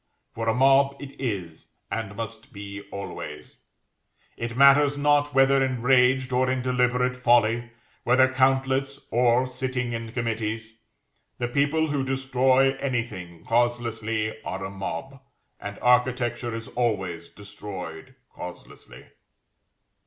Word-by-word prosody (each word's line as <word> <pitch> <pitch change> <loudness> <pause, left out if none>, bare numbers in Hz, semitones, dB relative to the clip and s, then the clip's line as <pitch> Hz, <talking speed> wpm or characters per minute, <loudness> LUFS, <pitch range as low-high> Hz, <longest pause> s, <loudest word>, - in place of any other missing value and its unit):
For 115 0 -2
a - - +3
mob 135 +1 +4
it 140 -1 -9
is, 95 -10 -4 0.2
and 105 -2 -3
must 115 0 -7
be 100 -1 -8
always; 75 -6 -8 0.7
it 120 +1 -5
matters 140 +1 +6
not 145 0 +2
whether 135 0 +5
enraged, 130 0 +2
or 130 +1 +2
in 130 -1 -1
deliberate 125 0 +1
folly; 120 -1 +3 0.3
whether 130 +2 +5
countless, 135 +1 +1
or 120 +1 +3
sitting 130 -1 -3
in 115 -1 -5
committees; 115 -1 -3 0.6
the 120 - -1
people 145 +4 +1
who 140 -2 0
destroy 135 0 +2
anything 115 -11 -4
causelessly 115 -2 0
are 95 +1 -4
a 95 - -6
mob, 100 +7 -6 0.4
and 100 0 -7
Architecture 125 -1 +2
is 115 0 -6
always 95 -8 -2
destroyed 100 +3 -8 0.2
causelessly. 90 0 -10
125 Hz, 115 wpm, -25 LUFS, 110-130 Hz, 0.7 s, matters